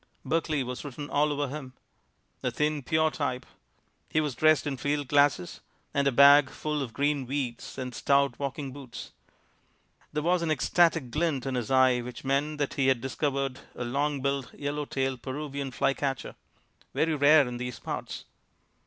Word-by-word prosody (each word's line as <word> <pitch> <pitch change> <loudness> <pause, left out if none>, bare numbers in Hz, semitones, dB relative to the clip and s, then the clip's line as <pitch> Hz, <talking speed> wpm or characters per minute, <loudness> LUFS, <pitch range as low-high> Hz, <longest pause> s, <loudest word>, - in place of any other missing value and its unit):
Berkeley 155 -3 0
was 125 0 -5
written 145 0 -7
all 150 +1 +2
over 145 0 -1
him. 135 -2 -7 0.7
A 125 - 0
thin, 150 +4 0
pure 155 +4 +2
type. 130 -4 -3 0.6
He 155 - +1
was 150 -3 -1
dressed 155 +2 +3
in 140 -2 -2
field 145 +2 -1
glasses 145 -10 +2 0.3
and 140 0 +2
a - - +4
bag 140 +1 +7
full 150 0 -3
of 130 -4 -4
green 140 0 0
weeds 130 -3 -4
and 125 -1 -4
stout 140 +1 +2
walking 140 -1 -4
boots. 130 -3 -9 1.0
There 150 0 -2
was 175 +1 +2
an 165 - -1
ecstatic 155 -2 +2
glint 150 -4 0
in 135 - -2
his 120 -4 -2
eye 130 -1 +4
which 125 +2 -8
meant 145 +3 0
that 145 -2 -1
he 135 -1 +1
had 130 -2 +3
discovered 135 +1 -2 0.2
a - - -4
long 140 +2 -1
billed, 140 -2 -1
yellow 145 +1 -3
tailed 135 -2 -2
Peruvian 140 0 -4
fly 135 +1 +1
catcher, 135 -2 -3 0.6
"very 160 0 +2
rare 145 -1 +6
in 120 0 -5
these 125 0 -5
parts." - - -6
140 Hz, 170 wpm, -28 LUFS, 130-150 Hz, 1.0 s, bag